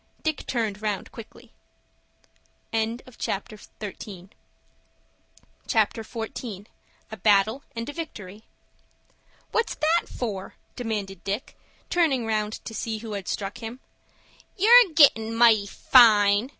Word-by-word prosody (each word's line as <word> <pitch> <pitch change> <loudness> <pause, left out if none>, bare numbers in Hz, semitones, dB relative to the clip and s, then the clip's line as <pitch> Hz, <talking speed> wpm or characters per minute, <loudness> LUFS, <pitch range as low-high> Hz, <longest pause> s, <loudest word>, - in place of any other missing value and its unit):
Dick 315 -2 -2
turned 220 -4 -2
round 210 -3 -3
quickly. 230 -2 -13 1.2
CHAPTER 225 -1 -3
XIV. 195 -3 -10 2.8
A 220 - -7
BATTLE 210 +5 +3
AND 230 +1 -4
A 290 - -5
VICTORY 210 - -8 1.1
"What's 455 - 0
that 325 +3 +1
for?" 200 -6 -5 0.2
demanded 205 -6 -4
Dick, 200 +5 -4 0.4
turning 295 -9 +2
round 215 -1 -1
to 225 - -7
see 220 0 -3
who 220 0 -8
had 200 -2 -5
struck 205 +4 -4
him. 230 +2 -7 0.8
"You're 455 +1 +7
gettin' 225 -8 +5
mighty 225 -3 +5
fine!" 210 -1 +5
225 Hz, 100 wpm, -25 LUFS, 205-250 Hz, 2.8 s, You're